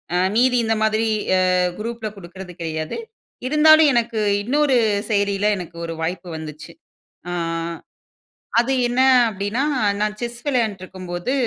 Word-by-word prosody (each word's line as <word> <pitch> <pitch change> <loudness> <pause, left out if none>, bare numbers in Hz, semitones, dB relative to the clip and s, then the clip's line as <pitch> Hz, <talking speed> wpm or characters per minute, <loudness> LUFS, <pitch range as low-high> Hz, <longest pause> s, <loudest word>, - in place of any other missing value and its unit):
அ - - +3 0.2
மீதி 250 +2 +3
இந்த 225 0 +1
மாதிரி 220 +1 +1 0.3
அ, - - +3 0.4
குரூப்ல 225 0 -4
குடுக்குறது 180 0 -10
கெடையாது. 155 -1 -4 0.5
இருந்தாலும், 310 +2 +6
எனக்கு 235 -2 0 0.2
இன்னொரு 275 +3 +2 0.3
செயலியில 200 -1 +1
எனக்கு 175 -2 -8
ஒரு 165 0 -5
வாய்ப்பு 175 +2 -3
வந்துச்சு. 155 +1 -9 0.6
அ - - -3 1.3
அது 245 +3 0 0.2
என்ன 245 +2 0 0.3
அப்டின்னா, 205 +6 -2 0.4
நான் 210 0 -1
செஸ் 240 0 -5
விளையாண்டுட்டுருக்கும்போது 190 -5 -2
210 Hz, 120 wpm, -21 LUFS, 180-240 Hz, 1.3 s, இருந்தாலும்